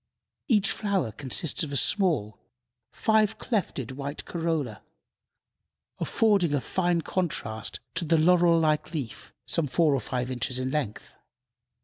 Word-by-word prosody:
Each 210 -5 +3
flower 195 - -1
consists 140 +7 0
of 150 - -4
a - - -3
small, 150 - +2 0.5
five 220 -1 +2
clefted 170 - -2
white 140 +2 -6
corolla, 160 - -2 1.2
affording 200 -9 +2
a - - +1
fine 175 +3 0
contrast 110 - -3
to 170 +1 -1
the 165 +1 +3
laurel 170 +1 +4
like 155 +1 0
leaf, 130 -8 -6
some 165 -3 0
four 155 +2 +2
or 135 - +1
five 125 +2 -3
inches 125 0 -2
in 130 0 -2
length. 135 -8 -3
155 Hz, 130 wpm, -27 LUFS, 130-180 Hz, 1.2 s, laurel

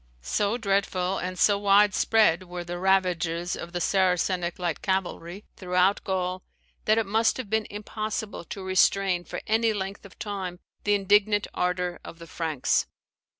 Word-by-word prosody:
So 205 - 0
dreadful 195 -3 0
and 185 0 -4
so 200 +1 +4
wide 205 0 +5
spread 205 -7 +3
were 175 0 -5
the 175 0 -6
ravages 180 -2 +1
of 170 - -7
the 175 - -3
Saracenic 180 -1 +1
light 175 -3 -2
cavalry 190 0 -2
throughout 185 +1 +1
Gaul 185 -1 -2 0.4
that 215 +1 +4
it 225 - +2
must 220 +3 +2
have 240 -6 -6
been 220 -1 +1
impossible 215 0 -5
to 195 - -7
restrain 185 -1 +2
for - - -6
any 225 +1 +2
length 195 -1 -5
of 200 - -14
time 190 -4 -5 0.3
the 205 0 +4
indignant 205 +1 +3
ardour 180 0 -1
of 170 - -10
the 165 - -11
Franks. 160 -5 0
190 Hz, 155 wpm, -26 LUFS, 180-205 Hz, 0.4 s, wide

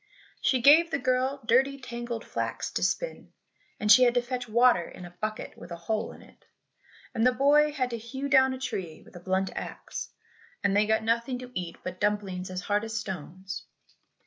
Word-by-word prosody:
She 255 -3 +2
gave 320 +5 +7
the - - 0
girl 260 +1 0
dirty 270 +4 +3
tangled 240 -2 -5
flax - - -3
to - - -2
spin, - - -2 0.5
and 210 0 +3
she 220 - +9
had 245 -1 +5
to 245 - +4
fetch 245 -1 -4
water 235 -6 +4
in 180 - -10
a 175 - -10
bucket 215 0 -4
with - - -11
a 170 - -5
hole 215 +6 -2
in - - -14
it, - - -21 0.7
and 225 - 0
the 255 - +6
boy 290 +4 +4
had 255 -4 -1
to 235 - -3
hew 265 +5 -5
down 265 -2 +5
a 260 - -4
tree 185 -11 -5
with - - -18
a - - -8
blunt 190 +2 -1
axe, - - -6 0.5
and 200 0 +2
they 210 +1 +3
got 220 0 +2
nothing 235 +3 0
to 250 0 -9
eat 175 -4 -4
but 185 0 -6
dumplings 200 -3 -1
as 185 0 -4
hard 205 +2 0
as 225 0 -3
stones. 190 -1 -6
235 Hz, 200 wpm, -28 LUFS, 195-255 Hz, 0.7 s, she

